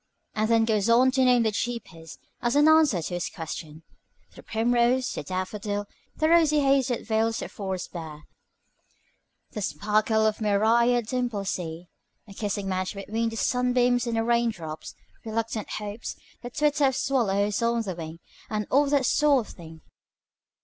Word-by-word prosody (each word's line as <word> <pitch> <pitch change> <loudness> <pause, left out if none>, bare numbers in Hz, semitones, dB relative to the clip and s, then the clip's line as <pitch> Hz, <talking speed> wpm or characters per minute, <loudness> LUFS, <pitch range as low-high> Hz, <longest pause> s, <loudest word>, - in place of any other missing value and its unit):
and 215 +1 0
then 225 -1 +4
goes 215 -1 +1
on 250 +3 +5
to 265 0 +2
name 250 -2 +4
the 220 - +1
cheapest 205 -8 -5 0.2
as 240 +2 0
an 295 +1 +5
answer 310 - +4
to 175 - -5
his 175 -2 -2
question. 160 -1 -7 0.5
The - - -11
primrose, 240 +3 +1
the - - -4
daffodil, 205 +2 -3 0.3
the 310 - +1
rosy 315 -3 +4
haze 275 -2 +3
that 245 -3 -3
veils 225 0 +1
the - - -4
forest 190 -3 -5
bare, 155 -3 -8 1.3
the 210 - -5
sparkle 215 +5 +1
of 215 -1 +1
the - - -16
myriad 230 +3 +3
dimpled 235 -5 -2
sea, 170 0 -5 0.4
a 200 - -11
kissing 205 -1 -3
match 185 +1 -2
between 220 +3 -2
the 225 - -7
sunbeams 245 +1 +1
and 230 -1 -1
the 225 - +1
rain 235 0 +2
drops, 160 -6 -7 0.3
reluctant 225 -1 -3
hopes, 210 +1 -5 0.3
the 245 - -6
twitter 295 +2 +1
of 265 -1 +2
swallows 210 -7 0
on 235 0 +1
the 190 -3 -4
wing, 165 -1 -7 0.3
and 210 -1 -2
all 285 +2 +4
that 280 -2 +2
sort 280 -3 +3
of - - -10
thing. 160 -2 -12
225 Hz, 170 wpm, -26 LUFS, 195-245 Hz, 1.3 s, on